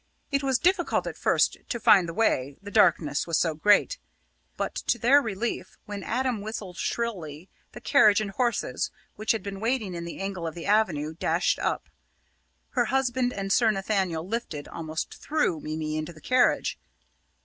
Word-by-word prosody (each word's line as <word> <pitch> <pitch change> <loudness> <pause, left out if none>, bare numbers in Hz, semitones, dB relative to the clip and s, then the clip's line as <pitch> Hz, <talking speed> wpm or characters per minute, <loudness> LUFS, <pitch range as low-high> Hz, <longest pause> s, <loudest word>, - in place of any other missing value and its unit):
It 275 0 +1
was 265 -2 +2
difficult 355 +2 +1
at - - -5
first - - +2
to 235 - -2
find 195 -5 +5
the - - -5
way, 140 - +1
the 200 +2 -10
darkness 170 -9 +3
was 165 - +1
so 165 -2 +1
great; 205 - +3 0.6
but - - -2
to - - -1
their 265 +5 +5
relief 225 -1 -4
when 205 -1 -6
Adam 245 0 -1
whistled 205 -4 -6
shrilly, 180 -8 -3 0.2
the - - -10
carriage 215 -8 +5
and 210 -2 -3
horses, 240 +3 -1 0.3
which 215 +1 0
had 225 - -1
been 200 -1 -6
waiting 225 -3 -1
in 170 -1 -5
the 170 - -7
angle 190 -3 -3
of 160 - -6
the 170 - -7
avenue, 180 -8 +1
dashed 165 +2 0
up. - - -2 0.8
Her 245 -3 +1
husband 255 0 +1
and 195 -3 -2
Sir 225 0 +4
Nathaniel 195 -5 -1
lifted 195 -9 -4
almost 160 -1 -5
threw 300 - 0
Mimi 155 0 -4
into 155 +2 -4
the 155 - -15
carriage. 255 +8 +2
205 Hz, 170 wpm, -26 LUFS, 165-235 Hz, 0.8 s, find